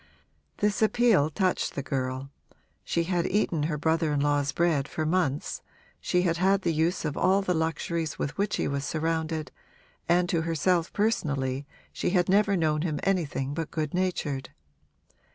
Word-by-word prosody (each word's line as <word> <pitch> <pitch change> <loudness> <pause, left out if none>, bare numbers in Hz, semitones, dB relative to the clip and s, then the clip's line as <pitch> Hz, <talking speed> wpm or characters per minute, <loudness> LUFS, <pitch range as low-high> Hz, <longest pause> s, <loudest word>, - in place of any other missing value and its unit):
This 210 +1 0
appeal 220 -8 +4
touched 185 +4 0
the 140 - -3
girl; 130 0 -3 0.5
she 170 - 0
had 175 0 0
eaten 180 -6 +1
her 150 - -1
brother 160 +1 +1
in 145 - +1
law's 145 -1 +1
bread 160 -5 +1
for 155 - -3
months, 160 -4 0 0.4
she 180 0 +1
had 165 -2 +1
had 190 +2 +2
the 170 - +1
use 160 +2 0
of 150 -1 -2
all 190 +2 +3
the 180 - +1
luxuries 160 -1 -2
with 145 - -3
which 200 +1 0
he - - -1
was 140 0 -2
surrounded, 160 0 -2 0.6
and 175 +1 +4
to 170 -3 +1
herself 165 +1 +1
personally 145 - -1 0.3
she - - -1
had 180 0 +2
never 200 0 +4
known 155 -2 +1
him 155 -3 -1
anything 150 -8 0
but 165 +1 -3
good 155 -2 -3
natured. 170 -7 -1
165 Hz, 165 wpm, -27 LUFS, 145-180 Hz, 0.6 s, appeal